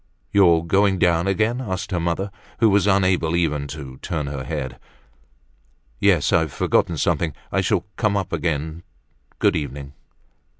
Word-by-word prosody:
"You 100 -3 +6
are 80 -1 +3
doing 95 +2 +2
down 85 0 +2
again?" 110 +6 +1
asked 95 -4 -4
her 90 - 0
mother, 85 +4 -2 0.3
who 115 -3 +4
was 100 0 +3
unable 95 -4 +2
even 75 -4 0
to 70 -3 -8
turn 75 0 -3
her 70 -2 -5
head. 75 -3 -5 1.2
"Yes; - - +3
I've 80 -3 +2
forgotten - - +1
something. 80 -3 0 0.2
I - - +1
shall - - 0
come 105 -3 +1
up 95 -3 -3
again. 80 0 -2 0.6
Good - - +2
evening." 70 -1 -5
85 Hz, 155 wpm, -22 LUFS, 75-95 Hz, 1.2 s, You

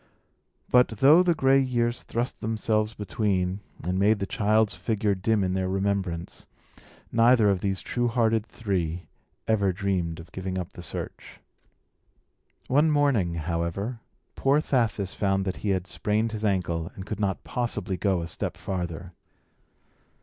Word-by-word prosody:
But, 125 0 +5
though 135 - +5
the 175 -2 +2
gray 135 -2 +4
years 120 -3 0
thrust 120 +2 -3
themselves 110 0 0
between, 95 -2 -1 0.2
and 90 +3 -1
made 105 +2 +4
the 100 - -2
child's 110 -2 +2
figure 110 -2 0
dim 100 +2 +1
in 90 0 0
their 95 0 -1
remembrance, 95 -3 -2 0.6
neither 115 -2 +5
of 95 -2 -1
these 95 -3 -1
true 120 +6 -1
hearted 115 -2 +2
three 90 -7 -3 0.4
ever 100 -3 +2
dreamed 90 -3 -2
of 85 +1 -12
giving 95 0 -4
up 90 -2 -5
the - - -9
search. - - -7 1.3
One 145 +5 +3
morning, 140 - +2
however, 85 +8 -2 0.3
poor 140 +2 +2
Thasus 115 -9 0
found 95 -1 0
that 95 - -2
he 105 - -3
had 95 -2 0
sprained 105 +4 -1
his 110 -1 -5
ankle, 90 -5 0
and 95 - -7
could 105 0 -5
not 100 -2 -1
possibly 105 -6 -2
go 95 -2 0
a - - -5
step 85 - -4
farther. 90 -1 -4
100 Hz, 150 wpm, -26 LUFS, 95-115 Hz, 1.3 s, But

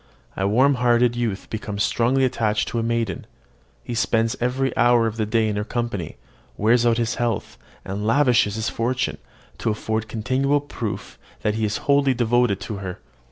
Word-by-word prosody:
A 95 - 0
warmhearted 125 0 +3
youth 115 -5 -2
becomes 105 -2 -2
strongly 130 +4 +2
attached 110 -4 0
to 115 - -2
a - - 0
maiden: 115 -5 -2 0.6
he 120 - -5
spends 115 +1 +1
every 130 +1 0
hour 120 -1 +4
of 110 -1 -2
the 110 -2 -1
day 110 0 +2
in 105 -1 -1
her 105 - -1
company, 110 -7 -4 0.4
wears 115 +3 +3
out 115 -1 +3
his 115 0 0
health, 115 -3 -2 0.3
and 100 +2 -4
lavishes 120 -5 +3
his 110 +1 -2
fortune, 120 +2 -1 0.4
to - - 0
afford 110 0 -2
continual 130 +6 +1
proof 125 -7 -6 0.2
that 105 - +1
he 110 0 -1
is 105 - -1
wholly 140 -2 +3
devoted 120 -3 +2
to 105 - -5
her. 95 -2 -6
115 Hz, 170 wpm, -23 LUFS, 105-125 Hz, 0.6 s, hour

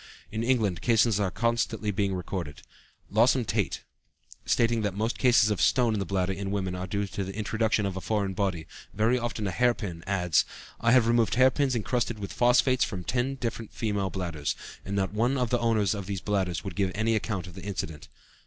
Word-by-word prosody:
In 110 - -2
England 110 -8 +1
cases 115 -3 +3
are 100 -2 +1
constantly 115 0 0
being 100 -1 0
recorded. 90 -5 -5 0.5
Lawson 120 +4 +4
Tait, - - -1 0.6
stating 115 -1 +2
that 100 -3 -2
most 110 +2 -2
cases 120 -4 +5
of 105 - -1
stone 120 -3 +3
in 105 - -1
the 95 - -3
bladder 95 -1 0
in 100 0 -4
women 95 -2 -2
are 90 +1 -4
due 100 +2 -1
to 100 0 -4
the 95 +1 -6
introduction 110 0 0
of 95 -2 -2
a 95 - -4
foreign 100 -2 -1
body, 95 -4 -1 0.3
very 115 +4 +2
often 115 -3 -3
a 100 - -1
hair 120 +4 +3
pin, 85 -6 -6
adds: 90 -4 +2 0.4
"I 115 - +3
have 125 -3 +6
removed 115 -3 +2
hair 130 +1 +6
pins 135 -1 0
encrusted 120 0 -1
with 100 -2 -6
phosphates 125 +1 +4
from 95 -4 -3
ten 125 +6 -1
different 115 -3 -5
female 105 -4 -1
bladders, 85 -7 -3 0.3
and 100 - -4
not 95 0 0
one 120 +6 +1
of 125 -3 -1
the 120 - +2
owners 110 -4 +2
of 100 -3 -5
these 100 -2 -3
bladders 95 -3 -1
would 95 -4 -6
give 95 0 0
any 110 +2 +1
account 105 -4 -2
of 90 - -10
the 95 - -9
incident." 90 -6 -5
105 Hz, 210 wpm, -27 LUFS, 95-115 Hz, 0.6 s, have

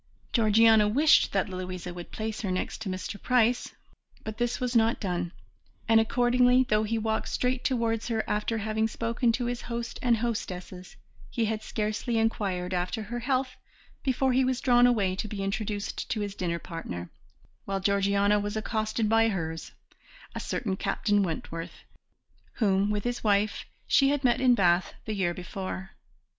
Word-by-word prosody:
Georgiana 220 -1 +5
wished 295 +9 +4
that 195 +1 +1
Louisa 185 -1 -5
would 175 -1 -8
place 220 -1 -4
her 200 - -2
next 185 +4 -3
to 210 - -3
Mr. 185 +2 -5
Price, 245 -1 +2 0.5
but 220 +1 -6
this 240 0 0
was 250 -1 -2
not 225 0 +3
done, 175 -3 -2 0.6
and 225 -1 +6
accordingly, 250 +2 +4
though 215 0 +3
he 220 +1 -1
walked 220 0 -1
straight 250 0 -1
towards 230 -3 0
her 225 -2 0
after 210 +2 -1
having 220 +1 0
spoken 230 +2 0
to 245 +1 -1
his 240 0 -3
host 235 0 -5
and 240 -2 +3
hostesses, 185 -5 -4 0.3
he 230 - 0
had 215 0 -2
scarcely 215 +3 -2
inquired 195 -5 -1
after 180 +5 -2
her 240 +4 -5
health 255 +1 -1 0.4
before 260 0 +1
he 260 +1 +3
was 255 -1 0
drawn 245 -2 +5
away 200 -6 +2
to 215 - -3
be 200 -2 -4
introduced 205 +1 -3
to 215 - -1
his 205 -1 -3
dinner 175 -3 -2
partner, 90 - -7 0.5
while 195 0 -2
Georgiana 200 +1 +2
was 205 +1 -3
accosted 215 0 -1
by 225 +1 +4
hers, 165 -5 -4 0.6
a - - -4
certain 195 -6 -2
Captain 205 +1 +1
Wentworth 165 -2 -5 0.7
whom, 200 -2 +2
with 210 -1 -1
his 245 0 -3
wife, 205 0 +1 0.2
she 275 -1 +4
had 290 -1 0
met 245 -1 +3
in 250 -2 +5
Bath 180 -3 +2
the 220 - -3
year 180 -4 0
before. 190 +1 -6
215 Hz, 165 wpm, -28 LUFS, 195-235 Hz, 0.7 s, and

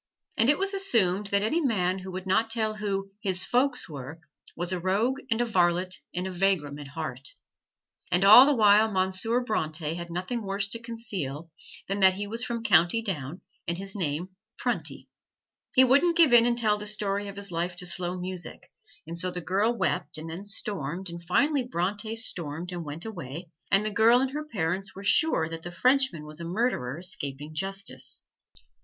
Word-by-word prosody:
And 225 - +3
it 290 - +5
was 390 +1 +1
assumed 210 - +2
that 200 0 +1
any 310 +11 +1
man 190 - +1
who 190 0 -8
would 185 +1 -6
not 220 +4 +2
tell 220 -2 -1
who 195 -2 -3
"his 185 -3 0
folks" 250 +1 +1
were, 150 +1 -8 0.4
was 175 +2 -2
a 180 - -2
rogue 210 +9 0
and 225 -2 +1
a - - +2
varlet 180 -3 +1
and 180 +1 -3
a 190 - -3
vagrom 175 -6 0
at 145 - -8
heart. 140 -3 -5 0.8
And 180 +1 +3
all 220 +7 +10
the 290 - +3
while 215 -1 +5
Monsieur 190 +5 0
Bronte 155 -8 -2
had 170 0 -6
nothing 185 +8 -3
worse 195 0 -1
to 230 - -3
conceal 190 - -4 0.4
than 195 +1 -2
that 190 -1 +5
he 205 +1 -3
was 230 +4 -4
from 235 -2 -3
County 185 +2 +4
Down 165 - -4 0.3
and 170 0 -1
his 195 0 -7
name 170 -2 -2 0.3
Prunty. - - -2 0.7
He 260 - +8
wouldn't 285 +7 +4
give 320 -7 +6
in 235 0 +7
and 240 0 +1
tell 215 -3 +2
the 210 - -5
story 205 -1 -1
of 200 - -7
his 200 -1 -6
life 175 +1 -2
to 180 0 -3
slow 180 +1 +1
music, 180 0 -7 0.3
and 165 +2 -6
so 185 - -1
the 180 - -5
girl 195 +6 +1
wept 160 -10 -1
and 155 +1 -7
then 170 +5 -7
stormed, 190 -4 -3
and 170 0 -8
finally 275 - +2
Bronte 210 0 -2
stormed 175 -6 -2
and 175 -1 -5
went 150 +4 -5
away, 170 -5 -7 0.2
and 200 +1 +3
the 215 - -1
girl 225 +4 +5
and 265 0 0
her 300 +2 -4
parents 195 - -2
were 195 - -9
sure 315 - +3
that 165 0 -6
the 175 - -7
Frenchman 250 - +2
was 150 +1 -7
a - - -6
murderer 170 - -1
escaping 150 -4 -4
justice. 195 +4 -2
195 Hz, 195 wpm, -27 LUFS, 170-225 Hz, 0.8 s, all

